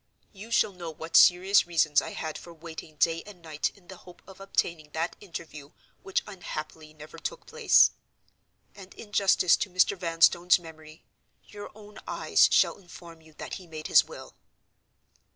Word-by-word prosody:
You 210 +3 -11
shall 230 - +2
know 175 -2 -8
what 160 +1 -8
serious 185 +2 +5
reasons 155 -4 +2
I - - -8
had 160 -1 -5
for 170 - -10
waiting 160 -1 -10
day 165 +2 +1
and 205 -4 -13
night 155 -3 -3
in 180 -3 -24
the 190 - -11
hope 180 -1 -17
of 190 0 -15
obtaining 170 -5 -2
that 165 +2 -3
interview 160 -6 -10 0.3
which 195 - -2
unhappily 155 -5 -8
never 155 0 -13
took - - -6
place; - - +4 0.8
and 190 -1 -14
in 210 - -12
justice 190 -3 +3
to 195 - -3
Mr. 185 +2 +2
Vanstone's 170 0 +3
memory, 160 -2 -14 0.4
your 205 -1 -10
own 210 0 -14
eyes - - +3
shall - - +3
inform 170 -3 -14
you 160 0 -20
that - - -9
he 180 - -15
made 155 -1 -9
his - - +5
will." - - -12
170 Hz, 170 wpm, -27 LUFS, 160-190 Hz, 0.8 s, serious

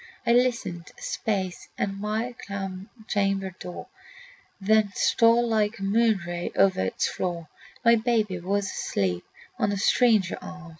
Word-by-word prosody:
I - - +3
listened 235 -9 +1
a - - -15
space 190 -4 -2
at 195 - -1
my 215 +4 -2 0.7
chamber 195 -2 0
door, 180 - -7 0.7
Then 210 +1 +3
stole 235 +1 +4
like 215 -1 +1
a 195 - -7
moon 215 0 +3
ray 175 0 -4
over 195 - +4
its 95 - 0
floor. 170 -3 -3 0.4
My 235 0 +7
babe 220 -3 +1
was 200 +2 0
asleep 90 - -1 0.4
on 205 - +2
a 200 - -1
stranger 215 -2 +3
arm. 180 -2 -9
200 Hz, 140 wpm, -26 LUFS, 185-225 Hz, 0.7 s, My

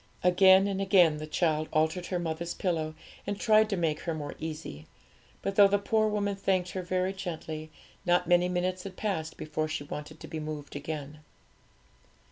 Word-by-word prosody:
Again 190 +1 +6
and 195 -1 -1
again 180 -6 +5
the 155 0 -6
child 155 -1 0
altered 160 +3 +1
her 180 - -1
mother's 170 0 -3
pillow, 160 -4 -1 0.3
and 205 0 -2
tried 215 -1 +4
to 200 - -1
make 160 -3 0
her 165 -2 -3
more 145 -2 -5
easy; 155 - -6 0.6
but 195 - -1
though 200 -1 +9
the 200 +1 +2
poor 215 +2 +1
woman 205 -1 0
thanked 185 -2 0
her 185 - -3
very 185 +1 -1
gently, 160 -4 -6 0.3
not 180 -1 +3
many 175 0 +4
minutes 180 +1 -1
had 185 0 -9
passed 165 -7 -2
before 155 0 -2
she 155 -2 -3
wanted 150 +2 -7
to - - -9
be 160 - -5
moved 150 -2 -6
again. 150 0 -5
175 Hz, 180 wpm, -29 LUFS, 155-190 Hz, 0.6 s, though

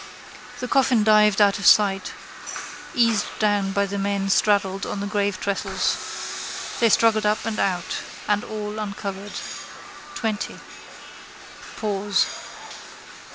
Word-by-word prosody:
The 250 - -2
coffin 255 -4 +3
dived 210 -1 +5
out 205 -1 +4
of 200 - -4
sight, 195 -2 +5 0.8
eased 230 -3 +3
down 205 -2 +1
by 200 +1 +1
the 200 0 -4
men 195 0 -1
straddled 195 -1 +2
on - - -3
the 200 - -3
gravetrestles. 200 -1 -2
They 230 - +4
struggled 220 0 +4
up 210 0 0
and 225 -2 -2
out: 180 -3 -1 0.3
and 210 0 +1
all 210 0 -5
uncovered. 200 -1 -5 0.8
Twenty. 220 -2 -3 1.2
Pause. 205 -2 +1
205 Hz, 110 wpm, -23 LUFS, 200-215 Hz, 1.2 s, dived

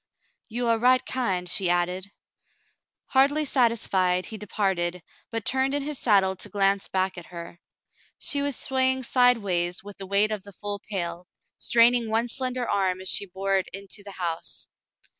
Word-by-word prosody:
"You 240 +2 -2
are 230 -1 +2
right 255 +2 +4
kind," 190 -9 -1
she 180 +1 0
added. 180 +2 0 1.0
Hardly 285 +3 +4
satisfied, 195 -9 +2
he 220 - -7
departed, 180 -4 -1 0.3
but 225 -2 -4
turned 265 +1 +2
in 290 - -1
his 295 -1 -4
saddle 195 -4 +3
to 205 - -5
glance 195 0 +1
back 190 -1 -1
at 170 - -13
her. 170 0 -9 0.6
She 285 - 0
was 285 -2 -1
swaying 260 0 +1
sidewise 200 -10 +2
with 205 0 -11
the 195 - -8
weight 200 +2 +2
of 210 -2 -3
the 200 +1 -11
full 205 +1 -5
pail, 175 -3 -4 0.3
straining 235 0 +4
one 225 +2 +1
slender 255 0 0
arm 190 -2 0
as 185 - -3
she 200 - +1
bore 195 +1 0
it 190 - -2
into 200 +1 -5
the 200 -1 -8
house. 170 -3 -3
200 Hz, 165 wpm, -26 LUFS, 185-245 Hz, 1.0 s, right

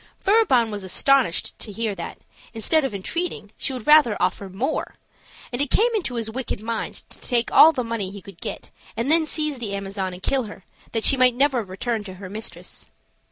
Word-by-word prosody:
Furibon 385 - +3
was 205 -2 -5
astonished 250 +1 +2
to 215 - -7
hear 220 0 -2
that, 170 -3 -7 0.4
instead 310 +8 +2
of 265 -7 -2
entreating, 215 - -3
she - - -2
would 255 -4 -6
rather 300 -7 +6
offer 195 - -1
more; 245 +11 -2 0.6
and 245 - -1
it 285 - 0
came 465 - +3
into 350 - -1
his 230 -2 -2
wicked 240 0 -4
mind 225 +1 -3 0.2
to - - -8
take 240 -2 +1
all 320 - +9
the 255 -5 -2
money 230 -5 -3
he 200 +1 -9
could 190 -2 -14
get, - - -5 0.3
and 235 +6 0
then 320 -1 +4
seize 305 -3 -1
the 205 -4 -3
Amazon 195 -1 -3
and 180 +1 -10
kill 265 -3 +1
her, 205 -3 -11 0.3
that 225 -1 0
she 270 - +5
might 250 -1 +5
never 270 -1 +2
return 210 +3 -3
to 190 -2 -8
her 185 0 -9
mistress. 220 +2 -7
230 Hz, 205 wpm, -23 LUFS, 200-275 Hz, 0.6 s, all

